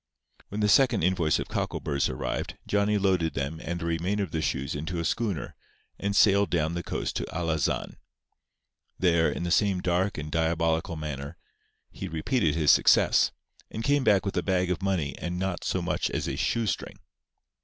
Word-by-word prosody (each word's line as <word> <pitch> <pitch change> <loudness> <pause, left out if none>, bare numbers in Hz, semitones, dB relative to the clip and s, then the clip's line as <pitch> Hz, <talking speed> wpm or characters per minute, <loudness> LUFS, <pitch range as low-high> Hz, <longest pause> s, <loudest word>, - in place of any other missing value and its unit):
When 105 +2 -3
the 105 - +3
second 120 -2 +4
invoice 85 -3 +2
of - - -4
cockleburrs 70 -2 -1
arrived 65 -2 -4
Johnny 105 +1 +1
loaded 95 -5 +1
them 70 +4 -3
and 85 +1 -3
the 85 - -4
remainder 90 +5 0
of 90 - -6
the 80 - -1
shoes 70 -3 -2
into 80 +4 -4
a 85 - -2
schooner, 105 -6 -2 0.4
and 100 0 -1
sailed 100 0 +5
down 80 -1 0
the 85 - -2
coast - - -3
to - - -2
Alazan. 80 -4 -1 1.0
There, 85 -3 +3
in - - -4
the 85 - -2
same 95 +1 +3
dark 90 +2 0
and 75 0 -5
diabolical 80 +1 0
manner, 70 -3 -6 0.5
he - - -6
repeated 80 - 0
his 75 -3 +5
success; - - +4 0.4
and 110 - -5
came 140 +2 +2
back 105 -4 +3
with 100 - -2
a 90 - +1
bag 90 0 0
of 90 - -2
money 90 -7 -1
and 90 0 -3
not 95 -1 -2
so - - -1
much - - -1
as - - -2
a - - -2
shoestring. 115 -4 -1
85 Hz, 180 wpm, -27 LUFS, 80-100 Hz, 1.0 s, sailed